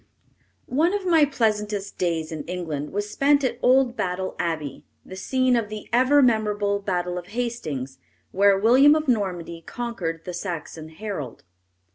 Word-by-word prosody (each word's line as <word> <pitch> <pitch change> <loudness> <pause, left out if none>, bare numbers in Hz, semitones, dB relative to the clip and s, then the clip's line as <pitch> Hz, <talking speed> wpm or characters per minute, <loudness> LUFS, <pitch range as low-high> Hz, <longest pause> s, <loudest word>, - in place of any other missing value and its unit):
] - - -40 0.2
One 325 +9 +1
of 400 -2 -3
my 325 -4 +5
pleasantest 210 -6 -1
days 165 -2 -1
in 155 -2 -5
England 160 -5 -4
was 205 +1 -2
spent 280 +6 +2
at 250 -2 -1
old 255 -1 +4
Battle 185 -1 -3
Abbey, 155 -5 -3 0.2
the 185 - -9
scene 255 +6 +1
of 225 -3 -1
the 215 -1 -7
ever 260 +4 +5
memorable 210 -4 +1
Battle 180 -3 -2
of 175 - -12
Hastings, 155 - -4 0.3
where 200 +1 +4
William 260 +8 +6
of 310 -1 -1
Normandy 180 -8 -1
conquered 185 -10 -5
the 180 - -5
Saxon 170 -3 -6
Harold. 160 - -6
205 Hz, 155 wpm, -24 LUFS, 175-245 Hz, 0.3 s, William